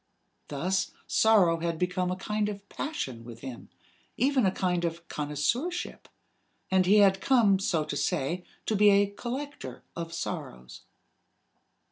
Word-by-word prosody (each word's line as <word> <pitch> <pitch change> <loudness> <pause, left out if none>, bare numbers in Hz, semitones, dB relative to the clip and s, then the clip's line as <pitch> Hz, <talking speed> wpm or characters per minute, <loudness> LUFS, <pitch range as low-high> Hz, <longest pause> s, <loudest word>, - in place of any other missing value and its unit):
Thus 180 +7 -1 0.2
sorrow 190 -7 +4
had 165 0 -2
become 180 +1 0
a 180 - -1
kind 210 +2 -1
of 200 -1 -8
passion 130 - -4
with 115 -1 -11
him, 130 -3 -8 0.5
even 260 -3 +3
a - - +2
kind 180 -2 0
of 170 0 -3
connoisseurship; 150 - -2 0.6
and 185 -1 +3
he 205 +3 +6
had 195 -2 +5
come, 220 -7 +4
so 165 -5 0
to 145 - -4
say, 165 +5 -1 0.2
to 220 - 0
be 210 +1 +6
a 200 0 +5
collector 265 +7 -6
of 165 -1 -5
sorrows. 60 - -6
185 Hz, 140 wpm, -28 LUFS, 165-210 Hz, 0.6 s, he